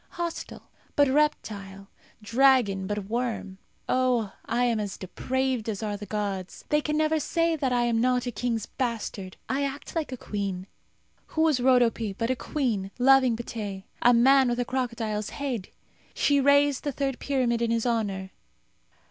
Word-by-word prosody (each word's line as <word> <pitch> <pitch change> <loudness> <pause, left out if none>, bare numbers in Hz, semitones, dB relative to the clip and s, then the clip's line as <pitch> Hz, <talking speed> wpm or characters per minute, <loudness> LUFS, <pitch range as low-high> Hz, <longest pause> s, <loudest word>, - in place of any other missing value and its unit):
Hostile, 345 -1 -5 0.3
but 285 -1 +5
reptile; 205 -9 -1 0.4
dragon, 230 -5 +3
but 205 -1 -3
worm. 220 -4 -3 0.3
Oh, 250 -5 +1
I 240 +2 +1
am 235 -2 +1
as 205 -2 -4
depraved 255 +4 -2
as 215 0 -3
are 210 -1 -2
the 205 0 -8
gods! 195 -3 -4
They 300 0 +3
can 300 0 -1
never 310 0 +2
say 330 +1 +1
that 275 -4 -1
I 245 -1 +2
am 230 -1 +1
not 250 0 +2
a 245 - -2
king's 230 0 -2
bastard. 220 -6 -4
I 275 +2 0
act 280 +3 -5
like 315 -4 -2
a 255 - -4
queen. 200 -5 -4 0.6
Who 315 - -2
was 310 -5 +3
Rodope 240 -5 +2
but 230 +2 0
a - - +1
queen 235 -9 -2
loving 260 -1 +5
Pteh, 205 -5 -5 0.2
a 245 - +6
man 260 +2 +5
with 240 0 -1
a 245 - 0
crocodile's 230 -5 -2
head? 255 -9 -4 0.5
She 285 -1 +3
raised 285 0 +4
the 290 - -1
third 270 -2 -2
pyramid 250 -4 0
in 235 - +1
his 230 0 0
honour. 200 -5 -1
240 Hz, 165 wpm, -27 LUFS, 210-270 Hz, 0.6 s, a